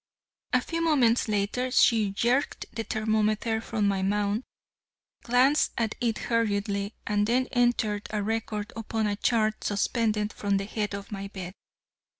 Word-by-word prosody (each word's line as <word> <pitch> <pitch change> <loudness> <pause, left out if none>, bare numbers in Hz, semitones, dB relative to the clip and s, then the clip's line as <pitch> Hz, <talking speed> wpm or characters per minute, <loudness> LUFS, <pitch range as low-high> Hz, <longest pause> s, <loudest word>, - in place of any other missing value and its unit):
A 250 - +3
few 330 +5 -3
moments 250 -8 +3
later 215 +5 0
she 225 -4 +4
jerked 240 +8 0
the 225 - -3
thermometer 215 +1 0
from 220 -3 -1
my 195 -1 +1
mouth, 205 +2 0 0.8
glanced 255 +5 +3
at 225 -2 0
it 230 -3 +1
hurriedly 205 -2 -1
and 210 -1 +1
then 250 +3 +2
entered 230 -4 +1
a 210 -1 -2
record 220 -1 -3
upon 225 0 -2
a 205 -1 0
chart 215 0 +1
suspended 210 0 0
from 200 -1 0
the 195 - -2
head 210 -1 -3
of 200 +1 -8
my 200 -1 -5
bed. 190 -2 -7
215 Hz, 150 wpm, -27 LUFS, 205-230 Hz, 0.8 s, she